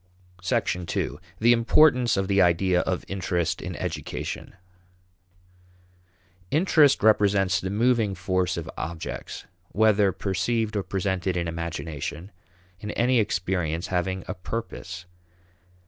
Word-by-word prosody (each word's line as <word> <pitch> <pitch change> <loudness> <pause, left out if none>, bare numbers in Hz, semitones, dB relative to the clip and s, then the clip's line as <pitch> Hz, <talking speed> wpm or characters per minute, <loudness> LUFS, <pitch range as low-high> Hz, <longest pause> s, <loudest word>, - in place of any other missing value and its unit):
2. 90 -1 -1 0.2
The 120 +2 +5
Importance 125 0 +4
of 95 0 0
the 100 0 +3
Idea 90 +1 +3
of 90 0 -2
Interest 90 -3 -1
in - - -5
Education. - - -5 1.9
Interest 155 - +4
represents 100 -3 +3
the 95 - -3
moving 110 -1 +2
force 95 -2 -1
of - - -5
objects 80 +3 -6 0.2
whether 105 -2 +3
perceived 105 +4 -1
or 100 - +1
presented 95 0 -2
in 85 -1 -1
imagination 85 +1 -5 0.5
in 105 - -6
any 125 +1 +2
experience 90 -5 -1
having 95 +1 -1
a - - -3
purpose. 90 -3 -6
95 Hz, 110 wpm, -25 LUFS, 90-110 Hz, 1.9 s, The